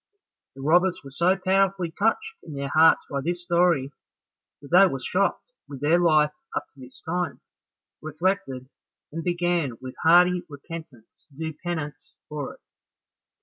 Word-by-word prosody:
The 135 - -9
robbers 175 +5 +3
were 135 - -11
so 175 +7 +2
powerfully 190 -2 +1
touched 440 - 0
in 155 -4 -10
their 140 0 -3
hearts 160 +1 +5
by 140 -1 -3
this 175 +3 -3
story, 170 -6 +2 0.7
that 140 +1 -14
they 190 +3 +7
were 135 -7 -3
shocked 200 - -1 0.2
with 140 -2 -8
their 160 +4 +3
life 155 -3 +4 0.2
up - - -2
to 140 - -21
this 130 0 -13
time, 175 +1 -2 0.6
reflected, 155 -5 -2 0.4
and 165 +2 -5
began 175 -7 0
with 130 0 -8
hearty 180 +2 +5
repentance 145 -5 -11
to 140 - -23
do 160 0 -4
penance 150 -3 -6
for 150 -2 -5
it. - - -28
165 Hz, 150 wpm, -25 LUFS, 145-180 Hz, 0.7 s, they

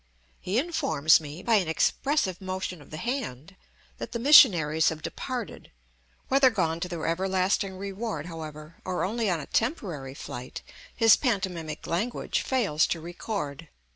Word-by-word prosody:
He 190 +4 -2
informs 275 - +3
me, 155 +3 -9
by 230 -2 +4
an 185 -5 0
expressive 190 - 0
motion 185 -3 -4
of 145 - -16
the 155 - -7
hand, 195 - -4 0.4
that - - -6
the - - -1
missionaries 175 - +6
have 155 -1 -7
departed; 250 -4 -5 0.6
whether 270 0 +5
gone 165 -8 -1
to 180 - -3
their 170 -2 -4
everlasting 190 +2 0
reward, 200 -4 -4
however, 155 -1 -9
or 185 -1 -2
only 220 +2 -1
on 175 -3 0
a - - -6
temporary 175 - -2
flight, 125 -2 -8 0.3
his 225 -1 +7
pantomimic 180 - -2
language 210 +9 -1
fails 205 - +1
to 170 - -2
record. 165 -3 -5
185 Hz, 145 wpm, -27 LUFS, 160-225 Hz, 0.6 s, his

